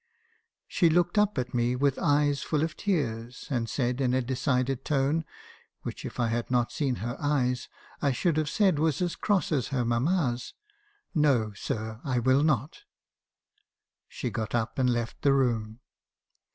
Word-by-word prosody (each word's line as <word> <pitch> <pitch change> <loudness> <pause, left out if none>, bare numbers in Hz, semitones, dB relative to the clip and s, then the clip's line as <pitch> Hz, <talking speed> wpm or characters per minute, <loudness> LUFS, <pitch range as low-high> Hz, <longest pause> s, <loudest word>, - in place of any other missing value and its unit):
She 170 - +3
looked 175 +4 +2
up 210 -3 +2
at 125 -1 -2
me 120 0 +1
with 135 +1 +1
eyes 145 -1 +2
full 155 -1 0
of 160 0 -2
tears, 125 - -2
and 115 -3 -1
said, 125 0 -1
in 125 -1 +2
a 130 - +2
decided 130 +1 0
tone 150 +3 +1 0.6
(which, - - -6
if - - -7
I 120 -2 +2
had 115 +1 -2
not 120 -2 +1
seen 135 -4 -1
her 120 +1 -3
eyes, 130 -4 0 0.3
I 140 - +2
should 160 +6 +1
have 155 -1 +1
said 190 -4 +2
was 155 -3 +1
as 175 - -1
cross 200 -2 0
as 140 -6 +1
her 130 -3 -1
mamma's), 125 +1 0 0.6
'No, 135 - +2
sir, 110 +3 -4
I 130 -4 -1
will 130 +3 +3
not.' 145 -1 0 1.3
She 125 - -4
got 110 0 -3
up, 110 +1 -1
and 125 -1 +3
left 120 -1 -2
the 140 - +4
room. 115 -4 0
130 Hz, 165 wpm, -28 LUFS, 120-150 Hz, 1.3 s, the